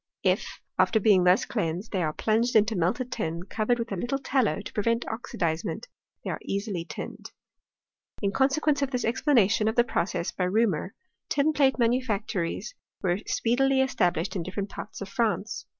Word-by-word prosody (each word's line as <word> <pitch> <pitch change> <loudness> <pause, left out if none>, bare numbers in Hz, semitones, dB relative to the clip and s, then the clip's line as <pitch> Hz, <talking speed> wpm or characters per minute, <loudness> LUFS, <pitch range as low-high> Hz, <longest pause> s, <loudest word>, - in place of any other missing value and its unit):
If - - +2 0.3
after 220 - +4
being 195 -4 +4
thus 180 +2 +4
cleansed 185 -1 -3
they 190 - 0
are 155 -2 0
plunj^ed 225 +8 +1
into 220 +1 +4
melted 225 +9 0
tin, 170 -5 -3
covered 220 +5 0
with 230 -1 -4
a - - -1
little 240 +8 -1
tallow 260 - +1
to 205 - -8
prevent 230 +3 0
oxidizement, 170 - -3 0.4
they - - -3
are - - -4
easily 200 -3 -3
tinned. 150 - -7 0.9
In 200 -2 0
(consequence 285 +4 +2
of 275 - +1
this 250 -2 -1
explanation 225 -4 +3
of 220 - 0
the 240 - +5
pro(jess 175 -6 -2
by 180 - 0
Reaumur, 195 -2 +1 0.4
tin 295 +2 +2
plate 275 -3 +3
manufactories 230 - -1 0.3
were 180 0 +1
speedily 265 +3 +2
established 180 -9 0
in 185 - -1
different 195 +3 -4
parts 210 - -8
of 200 - -4
France. 220 -1 -1
220 Hz, 165 wpm, -27 LUFS, 185-245 Hz, 0.9 s, the